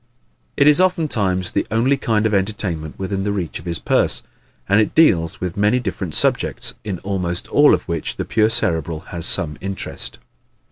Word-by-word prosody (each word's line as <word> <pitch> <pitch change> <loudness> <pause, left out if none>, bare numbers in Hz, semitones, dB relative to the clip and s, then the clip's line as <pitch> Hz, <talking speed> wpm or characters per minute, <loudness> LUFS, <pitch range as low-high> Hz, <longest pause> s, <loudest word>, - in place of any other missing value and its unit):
It 140 - +4
is 150 +4 +6
oftentimes 110 - +1
the - - -1
only 120 +5 +2
kind 110 -5 0
of 110 - +1
entertainment 95 -6 -1
within 95 0 -3
the 100 - -1
reach 95 -5 -3
of 80 - -14
his 85 -1 -2
purse; - - +1 0.4
and 100 +3 +4
it 105 - -2
deals 85 - +3
with 90 -2 -4
many 105 +5 +2
different 95 -7 -4
subjects, - - +1
in 100 -4 -4
almost 90 -3 -2
all 145 0 +5
of - - -7
which 85 -3 -4
the - - -3
pure 110 0 +2
Cerebral 80 -8 -1
has 85 -2 -3
some 75 -3 +2
interest. 95 -10 -6
95 Hz, 180 wpm, -20 LUFS, 85-110 Hz, 0.4 s, is